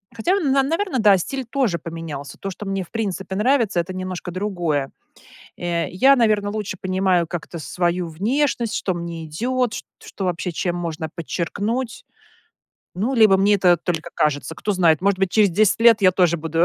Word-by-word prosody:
Хотя 345 - +1
на 275 -4 +2
наверно 330 0 -1
да, 205 -3 +6
стиль 265 +9 -4
тоже 235 -7 -1
поменялся. 160 -4 -7
То, 195 - -5
что 200 +2 -8
мне 195 -1 -2
в - - -18
принципе 195 -4 -3
нравится- 220 -4 +2
это 180 +2 -3
немножко 185 -1 -5
другое. 175 -7 -2 0.7
Э, 170 -1 -2
я, 265 +9 +5
наверно, 215 -4 +2
лучше 210 -3 -4
понимаю 185 -2 +1
как-то 170 -1 -6
свою 175 +2 -1
внешность, 230 - 0
что 185 - -1
мне 170 -1 -6
идет, 240 +9 -1
чт - - -5 0.2
что 195 - -7
вообще 175 0 -2
чем 175 +2 -2
можно 160 -2 -4
подчеркнуть. 205 - -3 0.9
Ну, 220 +9 -1
либо 215 -5 +6
мне 200 +2 +3
это 180 -2 +4
только 165 -1 -4
кажется, 150 +1 0
кто 210 - -2
знает, 170 -3 +3
может 200 -1 +2
быть, 195 -2 +1
через 210 -4 +4
10 210 +4 +3
лет 230 -2 +6
я 185 -1 +6
тоже 175 -2 +2
буду 165 +2 +1
185 Hz, 175 wpm, -21 LUFS, 170-220 Hz, 0.9 s, да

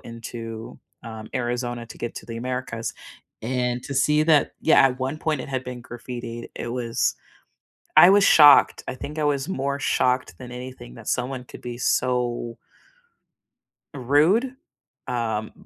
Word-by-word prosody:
into, 115 -1 -8 0.3
um, 110 -1 -8
Arizona 120 -1 -2
to 110 - -12
get 120 - -5
to - - -8
the 115 -1 -6
Americas, 125 -2 -4 0.5
and 125 +1 -1
to 140 - -5
see 150 +3 +3
that 155 -2 +3
Yeah, 160 - +5
at 130 -1 +1
one 130 +4 -2
point, 155 -3 -1
it - - -9
had 130 -1 -2
been 125 -1 -7
graffitied, 120 -1 -7
it - - -5
was 120 -2 0 0.8
I 175 - +10
was 200 0 +5
shocked. 145 -2 +7
I - - -4
think 145 +4 -7
I 150 - 0
was 140 -1 0
more 140 -4 -2
shocked 130 -2 0
than 125 -1 -10
anything 125 - -9
that - - -12
someone 130 0 -2
could - - -12
be 120 -1 -6
so 120 -2 0 1.4
rude. 155 - +2 0.5
Um, 110 -3 -2
125 Hz, 155 wpm, -24 LUFS, 120-140 Hz, 1.4 s, I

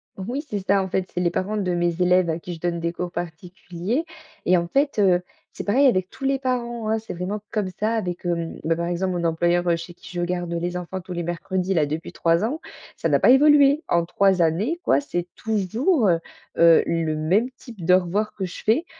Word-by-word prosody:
Oui, 240 +10 -4
c'est 205 - -2
ça 200 0 +4
en 190 - -2
fait, 185 0 -2
c'est 180 - -2
les 175 - +2
parents 205 +5 -2
de 185 -3 -1
mes 175 0 0
élèves 180 -1 +4
à 160 - -3
qui 175 +1 -7
je - - -13
donne 170 0 -1
des 170 0 -1
cours 175 0 -5
particuliers 175 - -4 0.4
et 180 0 +4
en 170 0 -1
fait, 280 - +1
heu, 180 -3 +4 0.3
c'est - - -6
pareil 260 +8 +3
avec 185 -6 +1
tous 270 - -12
les 270 0 +1
parents, 240 -4 -2
oh, - - 0
c'est 220 - -8
vraiment 185 +4 -3
comme 210 -4 -1
ça 220 +2 +1
avec, 180 -6 -3
hem 170 -1 -2
bah, 165 +1 +1
par 170 +1 -2
exemple 180 +2 -1
mon 175 -1 -2
employeur, 175 +2 +1
heu, 170 - +4
chez 170 +1 -8
qui - - -14
je - - 0
garde 175 -1 -2
les 175 +1 -2
enfants 180 +1 -5
tous 180 0 -8
les 175 - -3
mercredis 180 +2 -2
là 155 -3 +3
depuis 155 +3 -5
3 165 +2 +2
ans, 275 +9 -1 0.4
ça - - -1
n'a - - +3
pas - - +4
évolué. 285 +2 +6
En 170 -1 +2
3 190 +1 +2
années 200 - +1
quoi, 140 - +3
c'est 175 +5 -3
toujours, 220 - +1
heu 170 -2 +3 0.4
heu, 170 -1 +7
le 165 -2 0
même 190 +12 +1
type 230 -8 -11
d'au 180 +1 +6
revoir 195 +4 -2
que 190 - -3
je 180 - -8
fais. 250 +11 +2
180 Hz, 235 wpm, -23 LUFS, 170-215 Hz, 0.4 s, heu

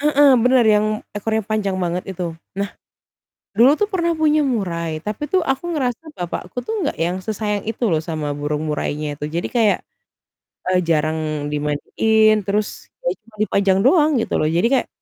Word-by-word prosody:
Heeh, 290 -1 +5 0.2
bener 250 -1 +5
yang 210 -1 +4 0.3
ekornya 220 +1 -1
panjang 205 -3 -1
banget 175 +1 -1
itu. 180 - -2 0.3
Nah, 200 0 -1 0.9
dulu 245 +5 +7
tuh 420 - +2
pernah 340 -2 +1
punya 305 -1 +3
murai, 180 - -1
tapi 210 +6 -4
tuh 375 - +4
aku 270 - -4
ngerasa 260 -5 -1
bapakku 180 +3 -5
tuh 445 - -3
enggak 290 - -1
yang 175 +3 0
sesayang 210 -1 -2
itu 225 +2 -4
loh 155 -1 +2
sama 155 -2 -3
burung 150 +1 -2
murainya 150 0 -2
itu. 150 - -5
Jadi 170 - -1
kayak, 225 -3 +4 0.9
eee, 185 0 +3
jarang 155 0 +1 0.3
dimandiin, 215 +9 +2
terus 205 +1 +1 0.4
ya - - +2
cuma 220 0 -23
dipajang 195 -2 +2
doang 300 +3 +5
gitu - - -3
loh. 155 - +2
Jadi 175 - +3
kayak 265 - +2
210 Hz, 170 wpm, -20 LUFS, 170-250 Hz, 0.9 s, dulu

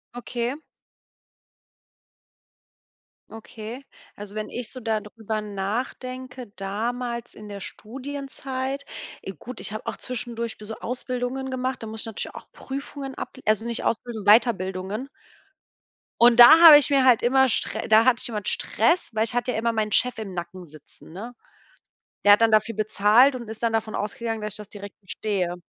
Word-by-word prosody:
Okay. 245 0 -3 2.8
Okay. 225 +3 -9 0.3
Also 205 0 -10
wenn 215 0 -4
ich 245 -2 -5
so 255 - -7
da 220 -2 0
drüber 215 +1 -5
nachdenke 245 +5 -5
damals 235 +4 -3
in 210 - -11
der 200 -1 -8
Studienzeit, 270 +3 -6 0.4
e - - -6
gut, 240 - -9
ich - - -4
habe 215 - -6
auch - - -2
zwischendurch 235 -2 -4
be 210 - -11
so 220 +1 -6
Ausbildungen 250 +1 -4
gemacht. 260 0 -3
Da - - -5
muss 220 0 -6
ich - - -5
natürlich 225 -2 -5
auch - - -11
Prüfungen 275 0 -7
able 260 - -7
also 215 +1 +2
nicht 235 0 -3
Ausbildung, 230 -2 -2
Weiterbildungen. 205 +1 +2 1.1
Und 240 0 +6
da 240 +7 +11
habe 320 -3 +12
ich 290 -2 +1
mir 275 -2 +3
halt 250 -3 +6
immer 265 +2 +4
str - - -2
da 220 0 +6
hatte 255 -2 +3
ich - - -4
immer 215 -2 -3
Stress, 350 +2 +1
weil 220 0 +1
ich 230 - -4
hatte 245 +1 0
ja - - -3
immer 230 +1 0
meinen 215 -1 -1
Chef 250 +4 +2
im 205 -4 -6
Nacken 175 +1 -7
sitzen, 155 0 -16
ne? 220 +8 -8 0.9
Der 205 - +8
hat 205 - +3
dann 225 -1 +5
dafür 215 +1 +2
bezahlt 215 +5 +4
und 235 -3 -7
ist 220 +1 -8
dann 230 -1 +1
davon 220 -1 -1
ausgegangen, 225 +1 -3
dass 210 -1 -4
ich - - -4
das 210 -1 -10
direkt 200 -1 -10
bestehe. 190 -2 -2
230 Hz, 170 wpm, -24 LUFS, 210-250 Hz, 2.8 s, habe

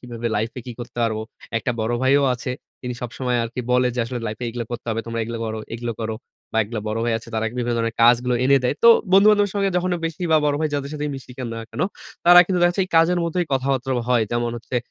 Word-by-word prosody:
কিভাবে 120 -1 -6
লাইফে 110 +4 -2
কি 125 - -5
করতে 120 0 -9
পারব? 110 -1 0 0.4
একটা 110 - -2
বড় 110 +2 -1
ভাইও 140 +2 +4
আছে। 125 +1 -5 0.3
তিনি 125 -1 -4
সবসময় 125 +1 -2
আরকি 115 +2 -5
বলে, 125 0 +4
যে 125 - 0
আসলে, 120 +1 -4
"লাইফে 110 +3 -5
এগুলা 120 0 -4
করতে 120 0 -6
হবে। 115 - -1
তোমরা 115 0 -3
এগুলা 115 0 -5
করো, 110 0 -3 0.2
এগুলো 120 0 -3
করো।" 110 0 -2 0.4
বা 110 - +1
এগুলা 110 +1 -5
বড় 110 +1 -2
ভাই 120 - +1
আছে। 115 - -14
তারা 110 - 0
বিভিন্ন 120 -1 -1
ধরনের 115 -1 -1
কাজগুলো 125 +1 +4
এনে 140 +1 +5
দেয়। 125 - +1
তো - - +10 0.2
বন্ধু-বান্ধব 205 +1 +6
সঙ্গে 200 -1 +1
যখন 180 +1 0 0.2
বেশি 165 +2 -6
বা - - +7
বড় 145 -1 +2
ভাই 155 - +1
যাদের 140 0 -3
সাথে 150 0 -3
মিশি, 135 -1 -10
কেন 125 -2 -4
না 115 - -5
কেন, - - -6 0.4
তারা 175 +1 +9
কিন্তু 185 -2 0
দেখা 175 - +6
যাচ্ছে 185 +2 0
এই - - -31
কাজের 175 +2 +4
মধ্যেই 170 +1 -1
কথাবার্তা 135 0 0 0.2
হয়। 120 -2 +3
যেমন 120 0 0
হচ্ছে, 120 +2 -5
125 Hz, 240 wpm, -22 LUFS, 115-145 Hz, 0.4 s, তো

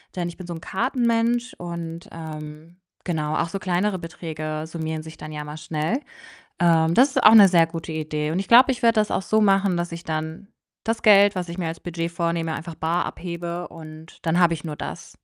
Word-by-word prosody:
denn 175 -1 -2
ich 170 - -11
bin 185 - -8
so 175 - -6
'n 165 - -8
Kartenmensch, 235 +2 0
und, 170 -1 -6
ähm, 155 +1 -9 0.3
genau, 155 -3 -2
auch 170 - 0
so 195 - -3
kleinere 185 +2 0
Beträge 160 -2 -5
summieren 160 -1 -4
sich 160 0 -11
dann 155 0 -8
ja 150 -1 -5
mal 150 +1 -8
schnell. 155 - -2 0.6
Ähm, 165 -1 +3
das 265 +3 +5
ist - - 0
auch 215 - +8
'ne 205 -3 +10
sehr 170 -2 +5
gute 165 -1 -6
Idee 155 0 -2
und 185 - 0
ich 195 - -6
glaube, 255 +3 +7
ich 245 -1 -7
werde 230 -1 +5
das 210 - -1
auch - - 0
so 215 +3 +2
machen, 195 -2 +3
dass 175 0 -3
ich 170 +1 -6
dann 160 +5 -5 0.3
das 225 0 -2
Geld, 205 -1 +6
was 180 -1 -3
ich 170 - -6
mir 165 -2 -1
als 165 - -5
Budget 170 -1 -4
vornehme, 170 -1 -2 0.2
bar 165 +2 0
abhebe 175 0 -5
und 160 0 -12
dann 170 +2 +1
habe 170 -1 +4
ich 155 - -9
nur 155 -2 -4
das. - - -7
170 Hz, 215 wpm, -23 LUFS, 160-195 Hz, 0.6 s, ne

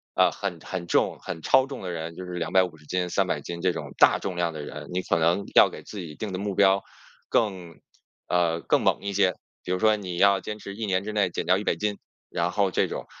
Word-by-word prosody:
啊， - - +5
很 95 -4 -4
很 90 -2 -5
重 - - +1
很 80 - -6
超 130 +10 +4
重 135 0 -7
的 90 - -4
人， 85 0 -5
就 90 - -7
是 90 - -7
250 85 -2 0
斤、 90 +3 -1
300 - - 0
斤 85 0 -6
这 90 0 +2
种 - - -6
大 - - +6
重 95 - -4
量 85 -1 0
的 75 - -6
人， 75 - -8
你 90 - 0
可 90 - +1
能 85 +4 +2
要 - - +8
给 - - -10
自 105 - -8
己 80 -5 -7
定 105 +3 -5
的 95 - -3
目 100 -1 -3
标 95 0 +4 0.5
更 95 -6 -1 0.5
啊， 85 -2 +1
更 - - +2
猛 - - +2
一 100 0 -3
些。 95 -2 +3 0.3
比 90 - -4
如 90 - 0
说 110 +1 +4
你 95 -4 -5
要 100 +1 +5
坚 105 0 -6
持 100 -1 -8
1 110 +1 -3
年 95 -1 0
之 110 - -4
内 105 -3 +1
减 - - -4
掉 90 +2 +4
100 105 - 0
斤， 105 -1 -2 0.3
然 85 +1 -1
后 100 0 +1
这 - - +2
种。 - - -5
90 Hz, 245 characters per minute, -26 LUFS, 85-100 Hz, 0.5 s, 要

